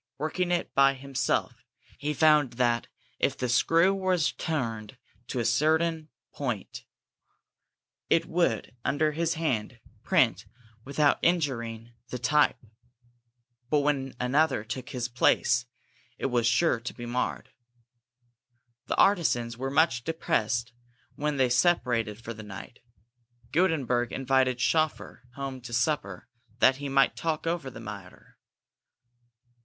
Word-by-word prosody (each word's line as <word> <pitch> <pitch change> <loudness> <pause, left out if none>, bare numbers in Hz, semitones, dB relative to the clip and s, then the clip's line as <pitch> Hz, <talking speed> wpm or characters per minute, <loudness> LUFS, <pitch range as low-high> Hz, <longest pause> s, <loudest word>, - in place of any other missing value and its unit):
Working 160 +5 -2
it 175 0 -1
by 135 0 +4
himself, 130 -2 -2 0.4
he 145 +2 -2
found 150 -3 +4
that 120 -1 +1 0.3
if - - +1
the 125 - -2
screw 165 +9 +3
was 185 -4 +1
turned 115 -7 -4 0.3
to 130 - -3
a 115 - -1
given 155 +6 +1 0.2
point, 125 -9 -4 1.2
it 165 0 +3
would, 170 -6 -1
under 150 +3 +1
his 165 +2 -1
hand, 125 -7 -2 0.2
print 130 - +2 0.4
without 145 +2 +2
injuring 120 -9 -1 0.2
the 125 - -4
type; 150 +4 +2 1.1
but 150 0 +3
when 135 -3 -1
another 135 -1 +2
took 125 +3 -6
his 125 -2 -3
place, 125 0 +2 0.5
it - - -4
was 120 -2 +2
sure 160 -1 +2
to 115 - -6
be 120 - -7
marred. 120 +1 -3 1.4
The - - -1
artisans 120 -12 +2
were 130 +3 -3
much 140 -4 +2
depressed 120 -6 -1 0.4
when 150 0 -2
they 130 -1 +3
separated 120 - +1
for 115 0 -7
the 110 - -10
night. 105 +2 -10 0.7
Gutenberg 140 -9 +1
invited 130 -1 +1
Schoeffer 155 +3 0
home 135 -2 -5
to 120 0 -9
supper, 115 - -1 0.3
that 130 +1 +4
he 140 0 -5
might 135 0 +3
talk 160 -1 -2
over 165 -5 -2
the 115 - -11
matter. 100 -5 -11
135 Hz, 125 wpm, -28 LUFS, 120-155 Hz, 1.4 s, by